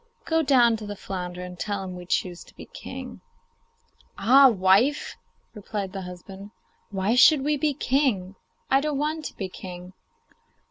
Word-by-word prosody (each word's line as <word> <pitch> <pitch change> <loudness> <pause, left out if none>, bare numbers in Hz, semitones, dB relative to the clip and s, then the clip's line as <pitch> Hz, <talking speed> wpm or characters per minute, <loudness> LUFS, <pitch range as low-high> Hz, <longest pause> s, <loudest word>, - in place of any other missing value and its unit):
Go 325 0 +2
down 245 -6 +4
to 215 -1 -8
the 205 - -5
flounder 180 -2 -6
and 180 -1 -9
tell 200 -2 -3
him 185 -1 -7
we 180 -1 -10
choose 180 -1 -2
to - - -20
be - - -10
king.' - - -9 1.0
'Ah, 270 +4 +7
wife!' 205 +7 +2 0.4
replied 205 -2 -5
her 195 - -5
husband, 190 +2 -10 0.4
'why 195 +2 0
should 265 +3 +6
we 300 +1 +1
be 295 -1 0
king? 255 -10 0 0.4
I 270 +1 +5
don't 300 -1 -2
want 305 +2 -2
to - - -7
be 195 - -3
king. 180 0 -10
205 Hz, 160 wpm, -25 LUFS, 185-270 Hz, 1.0 s, Ah